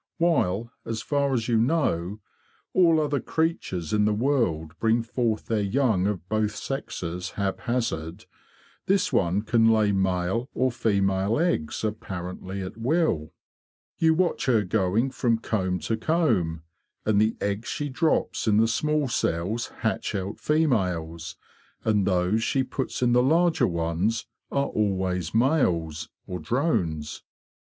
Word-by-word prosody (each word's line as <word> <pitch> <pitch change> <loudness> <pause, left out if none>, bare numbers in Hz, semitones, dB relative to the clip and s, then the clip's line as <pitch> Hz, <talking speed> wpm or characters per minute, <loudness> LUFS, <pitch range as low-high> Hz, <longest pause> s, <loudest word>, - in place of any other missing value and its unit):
While, 120 - +1
as 115 -1 -4
far 140 -1 +1
as 115 -4 0
you 115 -2 +2
know, 110 - 0 0.5
all 170 -3 +5
other 145 -2 0
creatures 125 - -2
in 105 -1 +3
the 105 0 +2
world 105 - 0
bring 115 +1 +2
forth 115 -2 -1
their 110 -2 0
young 105 -3 +1
of 95 -4 -3
both 110 +1 0
sexes 90 -9 -4
hap 100 -1 -1
hazard, 90 -10 -3 0.6
this 195 +1 +2
one 90 +4 +2
can 115 0 +3
lay 110 -2 +3
male 95 +5 0
or 130 0 +2
female 100 -3 +1
eggs 145 - 0
apparently 95 -2 -4
at 95 - -7
will. 115 - 0 0.7
You 160 -1 +4
watch 175 -3 0
her 115 -5 +4
going 105 +6 +1
from 120 -3 +1
comb 95 -5 -1
to 115 - -1
comb, 110 - +1 0.4
and 105 -1 +3
the 110 +1 +1
eggs 100 +2 -2
she 145 - -2
drops 145 -2 0
in 105 -1 +4
the 115 +1 +4
small 150 +5 +1
cells 105 0 -1
hatch - - -1
out 100 +2 -4
females, 90 - 0 0.5
and 105 -3 +2
those 90 +3 +2
she 130 +3 +1
puts 130 0 -3
in 120 - +3
the 125 - +5
larger 160 -1 +3
ones 85 +5 -1 0.3
are 140 0 +1
always 95 - -1
males, 85 - +1 0.2
or 90 - -5
drones. 80 - -1
110 Hz, 140 wpm, -26 LUFS, 90-130 Hz, 0.7 s, all